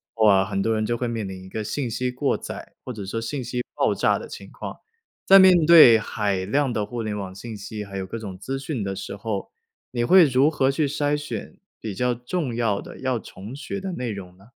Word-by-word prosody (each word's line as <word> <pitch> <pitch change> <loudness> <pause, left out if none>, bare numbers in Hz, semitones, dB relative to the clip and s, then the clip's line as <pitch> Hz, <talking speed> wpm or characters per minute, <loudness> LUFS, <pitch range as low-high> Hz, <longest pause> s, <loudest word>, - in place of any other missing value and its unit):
候 110 -1 +4
啊， 95 -2 +6
很 95 - -3
多 115 - +1
人 110 - 0
就 120 - 0
会 125 0 -2
面 115 -3 -3
临 95 -1 -8
一 - - -11
个 110 +3 -4
信 130 +4 -2
息 125 +3 -1
过 135 +3 0
载 - - -8
或 130 - -6
者 105 -5 -6
说 115 +4 -3
信 130 +3 -4
息 125 +1 -3
爆 - - +2
炸 - - +2
的 - - -8
情 - - -10
况， - - -7 0.5
在 195 - +8
面 180 -4 +7
对 155 -10 +9
海 100 -3 -2
量 135 +4 +1
的 105 - 0
互 115 +2 -4
联 105 -1 -3
网 95 -2 -5
信 110 +2 -7
息， 105 +1 -6
还 100 - -10
有 95 - -4
各 115 - -5
种 100 -5 -7
资 135 +7 -4
讯 135 -4 -4
的 95 0 -3
时 100 +1 -6
候， 100 0 -4 0.4
你 120 -1 -1
会 185 +8 +7
如 135 +1 +4
何 135 -4 +1
去 145 +2 0
筛 145 +1 0
选 150 +6 -6 0.2
比 110 - -5
较 125 +4 0
重 125 +1 -3
要 115 -4 0
的 - - -11
要 130 -3 0
重 105 +5 -10
学 190 +8 -5
的 190 -1 -4
内 125 -8 -3
容 90 -3 -8
呢？ 95 - -20
115 Hz, 265 characters per minute, -24 LUFS, 105-135 Hz, 0.5 s, 对